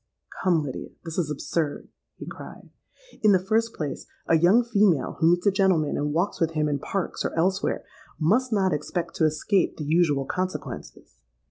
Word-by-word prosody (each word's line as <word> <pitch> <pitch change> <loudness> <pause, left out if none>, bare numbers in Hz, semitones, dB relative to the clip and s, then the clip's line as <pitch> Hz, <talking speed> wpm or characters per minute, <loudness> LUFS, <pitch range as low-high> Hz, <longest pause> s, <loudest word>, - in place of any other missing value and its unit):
'—'Come, 175 -4 +3
Lydia, 135 -3 -6 0.2
this 165 +1 -3
is 160 -4 -1
absurd,' 150 +1 -3 0.3
he - - -9
cried. - - -10 0.5
'In 210 -2 +5
the 185 -1 +2
first 225 +2 +1
place, 145 -4 -5 0.2
a 165 - +3
young 180 +9 +5
female 200 - +2
who 160 - +4
meets 175 +2 +2
a 200 - +5
gentleman 185 -6 +2
and 150 0 -1
walks 175 +6 -1
with 165 0 +1
him 155 -1 +1
in 145 -1 -1
Parks 195 +6 -3
or - - -3
elsewhere, 190 +4 0 0.4
must 230 +11 +2
not 195 -4 +2
expect 160 +4 -3
to 160 - +3
escape 160 +5 +1
the 155 - -4
usual 150 -3 +2
consequences. 150 - -5
170 Hz, 175 wpm, -25 LUFS, 150-195 Hz, 0.5 s, In